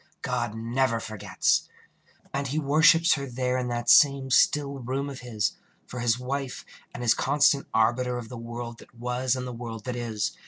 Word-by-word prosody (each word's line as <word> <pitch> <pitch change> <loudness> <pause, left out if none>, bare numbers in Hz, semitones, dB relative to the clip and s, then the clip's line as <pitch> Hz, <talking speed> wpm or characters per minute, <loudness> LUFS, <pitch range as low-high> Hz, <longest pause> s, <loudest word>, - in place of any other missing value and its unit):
God 120 -4 -2
never 115 +1 0
forgets. 110 -2 -1 0.6
And 140 0 -2
he 140 +4 -3
worships 160 +3 +5
her 140 -2 -3
There 125 0 -1
in 125 - -2
that 120 0 -3
same 140 -2 +5
still 140 +1 +3
room 135 +3 -3
of 135 - -8
his, 115 -4 -1 0.3
For 125 - -7
his 120 -1 +2
wife, 135 +1 -4 0.3
and 120 - -7
his 115 - +5
constant 140 0 +2
arbiter 120 +2 +1
Of 120 -2 -6
the 125 - -9
world 120 0 -7
that - - -17
was 125 +2 -1
and 130 -1 -4
the 125 - -6
world 115 -2 -7
that 125 +1 -4
is. 115 -4 -3
125 Hz, 185 wpm, -26 LUFS, 120-135 Hz, 0.6 s, worships